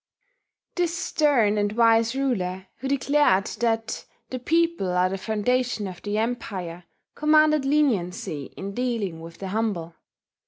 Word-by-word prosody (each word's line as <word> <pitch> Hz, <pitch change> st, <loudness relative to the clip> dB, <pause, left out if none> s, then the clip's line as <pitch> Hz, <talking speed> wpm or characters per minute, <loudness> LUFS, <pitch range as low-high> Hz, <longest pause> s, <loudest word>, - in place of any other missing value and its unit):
This 350 Hz, -1 st, 0 dB
stern 260 Hz, -, +2 dB
and 205 Hz, 0 st, 0 dB
wise 230 Hz, +1 st, +4 dB
ruler, 190 Hz, -9 st, -1 dB
who 270 Hz, -, -5 dB
declared 275 Hz, -7 st, +3 dB
that 225 Hz, -1 st, -1 dB, 0.3 s
"the 255 Hz, -, -3 dB
people 330 Hz, -, +1 dB
are 180 Hz, +1 st, +2 dB
the 195 Hz, -, -3 dB
foundation 220 Hz, +1 st, 0 dB
of 185 Hz, -2 st, -9 dB
the 205 Hz, 0 st, -2 dB
Empire," 190 Hz, -7 st, -3 dB, 0.3 s
commanded 305 Hz, -1 st, +4 dB
leniency 195 Hz, -, 0 dB
in 195 Hz, +1 st, -5 dB
dealing 225 Hz, -8 st, -2 dB
with 165 Hz, 0 st, -10 dB
the 195 Hz, -, -6 dB
humble. 195 Hz, -6 st, -2 dB
225 Hz, 130 wpm, -25 LUFS, 190-270 Hz, 0.3 s, wise